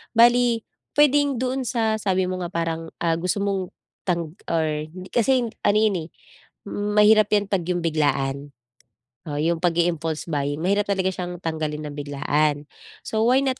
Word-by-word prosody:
Bale 240 0 +5 0.3
puwedeng 285 -3 +3
doon 260 0 -1
sa 220 -2 +1
sabi 190 -2 +1
mo 185 0 -3
nga 175 - -3
parang, 165 -1 -2 0.2
ah, 165 -1 +2
gusto 180 +3 -1
mong 195 -2 -1 0.4
tang 170 -2 -1 0.2
or 160 -1 +1 0.2
hindi 185 +2 -10
kasi, 250 +2 +3
yun - - -2 0.2
ano 205 +1 +4
'yon, 215 -3 +3
eh, - - -27 0.6
mahirap 210 +1 +4
yan 205 -1 +3
'pag 185 -3 +1
'yong 175 -2 -1
biglaan. 140 -3 0 0.8
Oo, 145 - -3
'yong 165 +2 +1
pag-i-impulse 165 -2 0
buying, 145 0 -1
mahirap 200 +2 +1
talaga 190 -1 +1
siyang 180 -1 -5
tanggalin 155 -2 -3
nang 145 - -6
biglaan. 145 +1 0 0.4
So 220 0 0
why 255 +2 +5
not, 265 -1 -1
180 Hz, 165 wpm, -23 LUFS, 160-215 Hz, 0.8 s, Bale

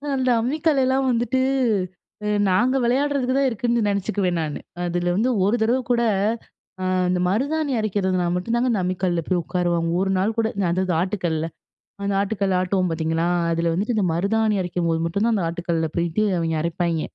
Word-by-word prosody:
அந்த 260 -1 +1
அம்மிக்கல்லலாம் 270 -1 +1
வந்துட்டு 240 +2 0 1.1
நாங்க 240 +8 +2
விளயாடுறதுக்கு 260 +1 +1
தான் 275 - +3
இருக்குன்னு 235 0 0
நினச்சுக்குவேன் 195 -3 0
நானு. 150 -2 -4 0.2
அதில 175 0 0
வந்து 230 +6 +2 0.2
ஒரு 205 +4 +2
தடவ 235 +4 +2
கூட 240 -1 +3 1.1
அந்த 180 - +1
மருதாணி 285 +8 0
அரைக்கிறதுனால 190 -4 0
மட்டும் 205 +6 -1
தாங்க 245 +2 +1
இந்த 205 -4 +1
அம்மிக்கல்ல 180 -1 0
போய் 180 -2 +1
உட்காருவாங்க. 175 -1 0
ஒரு 190 0 0
நாள் 205 +4 0
கூட 225 - +2 0.2
அதாது 185 0 0
ஆட்டுக்கல்ல 175 -4 -1 0.6
அந்த 200 0 -1
ஆட்டுக்கல் 200 -1 0
ஆட்டுவோம் 185 -1 0
பாத்தீங்களா. 160 +1 -1 0.3
அதில 165 0 0
வந்துட்டு 205 +8 -1
இந்த 205 - +2
மருதாணி 215 +5 +1
அரைக்கும்போது 170 -2 -1
மட்டும் 200 +5 -1
தான் 230 -1 +2
அந்த 190 - -1
ஆட்டுக்கல்ல 170 -1 -2
பெயிட்டு 170 +5 0
அவங்க 165 -1 -1
அரைப்பாய்ங்க. 170 -1 -1
190 Hz, 155 wpm, -22 LUFS, 175-235 Hz, 1.1 s, தான்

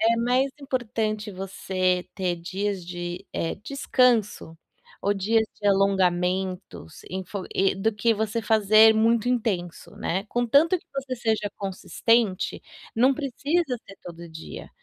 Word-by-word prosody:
é 230 +1 +3
mais 250 +4 +2
importante 220 -5 -2
você 185 -1 -1
ter 180 -3 -1
dias 190 +2 -3
de, 175 +2 -6
eh, 165 - -2
descanso 235 - +1 0.4
ou 200 +1 +1
dias 220 +3 +2 0.2
de 205 - -2
alongamentos 185 - 0
enf 190 0 -6 0.5
do 220 +3 +1
que 225 +2 +2
você 220 +1 -2
fazer 220 0 +6
muito 230 +1 +2
intenso, 205 -8 -2
né. 190 +4 -2
Contanto 280 - +3
que - - -28
você 270 -1 -3
seja 220 -3 -1
consistente, 200 +1 0 0.3
não 255 +4 +4
precisa 285 +1 -1
ser 195 - -12
todo 170 0 -9
dia, 160 0 -9
210 Hz, 125 wpm, -25 LUFS, 185-235 Hz, 0.5 s, fazer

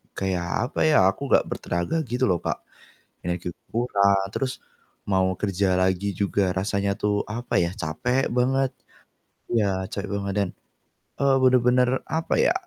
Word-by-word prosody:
kayak 95 +5 -1
apa - - -4
ya, 150 -10 +5
aku 120 +9 -1
nggak - - +5
bertenaga 85 - -2
gitu 125 +2 -1
loh, 90 -5 +2
Kak. - - -3 0.6
Energi 90 0 -3 0.2
kurang, 100 -4 +2
terus 130 -1 -2 0.5
mau 95 -1 +2
kerja 100 -2 +1
lagi 95 +2 +1
juga 100 -1 +1
rasanya 100 +1 0
tuh, 105 -1 +1
apa 120 +3 -2
yah, 85 +2 -1
capek 110 - -1
banget 130 +2 +2 0.8
iya, 100 -5 +1
capek 100 -1 -4
banget 100 0 -3
dan, 100 -2 +1 0.7
eee, 140 -1 +4
bener-bener 125 -1 +4 0.2
apa 160 +1 -1
ya, - - +4
100 Hz, 140 wpm, -25 LUFS, 95-125 Hz, 0.8 s, ya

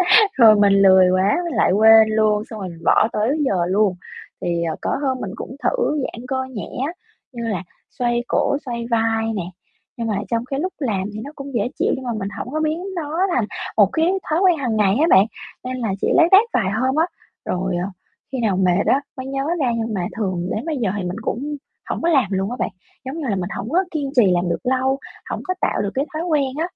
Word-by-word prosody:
à, 435 -2 +7
rồi 225 -4 +7
mình 205 -1 +4
lười 190 -2 +6
quá 190 - +2
mình 340 - -3
lại - - +3
quên 220 +2 +7
luôn, 215 -1 +2
xong 220 -2 -7
rồi 185 -2 -5
mình 165 -1 -12
bỏ 215 - +4
tới 235 +9 +1
giờ 185 -8 +1
luôn. 195 0 +2 0.5
Thì, 170 -1 -1
ờ, 160 -1 -2
có - - -1
hôm 260 -2 0
mình 190 - -4
cũng 260 - -8
thử 390 - +1
giãn 235 0 -6
cơ 260 -1 -1
nhẹ 225 -6 -6 0.2
á, 335 - -5 0.4
như 235 -2 -6
là 190 -5 -2 0.4
xoay 240 0 +1
cổ, 280 - +1
xoay 235 -2 -4
vai 225 0 +1
nè, 190 - -2 0.5
nhưng 230 -1 -3
mà 210 -3 -1
trong 230 +1 -1
cái 270 +1 -3
lúc 370 +3 -2
làm 215 -10 -1
thì 215 - -6
nó 285 - -8
cũng 275 -1 -8
dễ 235 0 0
chịu - - +2
nhưng 260 -1 -8
mà 240 - -2
mình 195 - -3
hổng 250 - -5
có 310 - 0
biến 315 +3 -1
nó 320 0 -3 0.2
thành 235 -4 +1 0.3
một 200 -3 +6
cái 325 +3 +2 0.2
thói 315 +1 +2
quen 360 -4 +4
hằng 245 -6 -1
ngày 200 -1 +3
á 325 - +4
bạn, 190 +1 +6 0.4
nên 255 0 -4
là 230 -4 -2
chỉ - - +1
lác 340 0 +5
đác 390 +3 +8
vài 190 - +1
hôm 260 +6 0
á. 320 +2 +3 0.4
Rồi, 185 0 -1
ờ, 190 - -3 0.4
khi 265 - -3
nào 210 -5 +1
mệt 185 0 +2
á 275 - +3 0.2
mới 260 - -5
nhớ 270 0 -2
ra 255 -4 +1
nhưng 225 -1 -2
mà 180 -4 -1
thường 185 -5 -2
đến 220 - -4
bây 315 -4 -2
giờ 230 -6 0
thì 200 - -3
mình 180 +2 -4
cũng 285 +7 -3 0.3
hổng - - -2
có 335 - +1
làm 270 -7 +4
luôn 195 +3 -1
á 250 - -4
bạn, - - 0 0.4
giống 270 +5 -5
như 295 - -3
là, 200 - +1
mình 180 -1 -3
hổng 220 - -5
có 355 +6 +2
kiên 285 -4 -3
trì 210 -7 +5
làm 175 0 +1
được 170 - -1
lâu, 260 +1 +1 0.3
hổng - - -3
có 370 - +1
tạo - - +1
được 200 - -2
cái 275 - 0
thói 315 +2 -2
quen 305 -5 +2
á. - - -2
230 Hz, 250 wpm, -21 LUFS, 200-275 Hz, 0.5 s, đác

